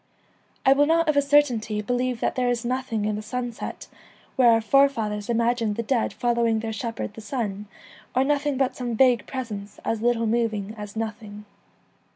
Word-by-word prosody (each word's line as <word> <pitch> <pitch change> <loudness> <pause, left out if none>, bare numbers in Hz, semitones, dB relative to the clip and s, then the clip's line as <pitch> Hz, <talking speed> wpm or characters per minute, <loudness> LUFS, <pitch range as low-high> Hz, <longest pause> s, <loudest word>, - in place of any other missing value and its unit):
I 270 - +7
will 290 +1 +3
not 330 +1 +3
of 305 - +2
a 285 - +5
certainty 260 -7 +2
believe 245 +2 -1
that - - +1
there 250 -1 0
is 240 -1 -1
nothing 245 -4 -2
in 210 0 0
the - - -4
sunset, 240 +1 -5 0.5
where 250 -2 +5
our 225 -1 +5
fore 275 +5 +4
fathers 210 -5 -4
imagined 230 -2 +1
the 230 - -2
dead 235 0 0
following 235 -2 +1
their 220 0 -4
shepherd 225 -1 -4
the 220 - -10
sun, 210 -3 -4 0.5
or 260 - +4
nothing 290 0 0
but 260 -1 0
some 245 -2 -3
vague 245 -2 +3
presence 210 -6 -6
as 225 -1 -1
little 235 -1 +2
moving 220 -3 -1
as 210 -1 -8
nothing. 215 -2 -6
235 Hz, 185 wpm, -24 LUFS, 215-255 Hz, 0.5 s, I